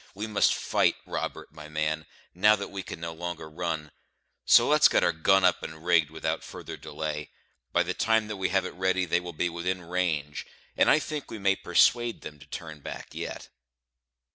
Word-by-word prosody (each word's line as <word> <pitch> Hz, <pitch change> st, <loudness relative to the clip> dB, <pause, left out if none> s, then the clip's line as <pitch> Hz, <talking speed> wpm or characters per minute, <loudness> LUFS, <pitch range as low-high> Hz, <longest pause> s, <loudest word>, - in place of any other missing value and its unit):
We 105 Hz, +2 st, -3 dB
must 105 Hz, -2 st, +3 dB
fight, -, -, +2 dB
Robert, -, -, -5 dB
my 75 Hz, -1 st, -10 dB
man, 75 Hz, 0 st, -2 dB, 0.3 s
now 105 Hz, +4 st, +5 dB
that 100 Hz, -1 st, -6 dB
we 100 Hz, -1 st, -4 dB
can 90 Hz, -, -8 dB
no 85 Hz, 0 st, -5 dB
longer 85 Hz, -1 st, -5 dB
run; 80 Hz, -2 st, -4 dB, 0.5 s
so -, -, +7 dB
let's -, -, +6 dB
get -, -, +2 dB
our 85 Hz, -, +4 dB
gun 95 Hz, +4 st, +3 dB
up 90 Hz, -, +3 dB
and 80 Hz, +1 st, -8 dB
rigged 80 Hz, -4 st, +4 dB
without 80 Hz, 0 st, -3 dB
further -, -, -8 dB
delay. 75 Hz, -2 st, -5 dB, 0.4 s
By 90 Hz, -, +3 dB
the 90 Hz, +1 st, -2 dB
time 110 Hz, +1 st, +2 dB
that 105 Hz, -1 st, -5 dB
we 95 Hz, -1 st, 0 dB
have 95 Hz, -1 st, +1 dB
it -, -, -5 dB
ready, 95 Hz, 0 st, +1 dB
they 85 Hz, 0 st, +2 dB
will 90 Hz, 0 st, -7 dB
be 90 Hz, +3 st, 0 dB
within 90 Hz, +2 st, -3 dB
range; 85 Hz, -5 st, -2 dB, 0.3 s
and -, -, +4 dB
I -, -, +6 dB
think 150 Hz, -2 st, -4 dB
we -, -, -6 dB
may 95 Hz, -1 st, +2 dB
persuade 120 Hz, +7 st, +2 dB
them 75 Hz, -1 st, -9 dB
to 70 Hz, -, -15 dB
turn 80 Hz, 0 st, -7 dB
back -, -, -8 dB
yet." -, -, -6 dB
85 Hz, 200 wpm, -28 LUFS, 80-95 Hz, 0.5 s, so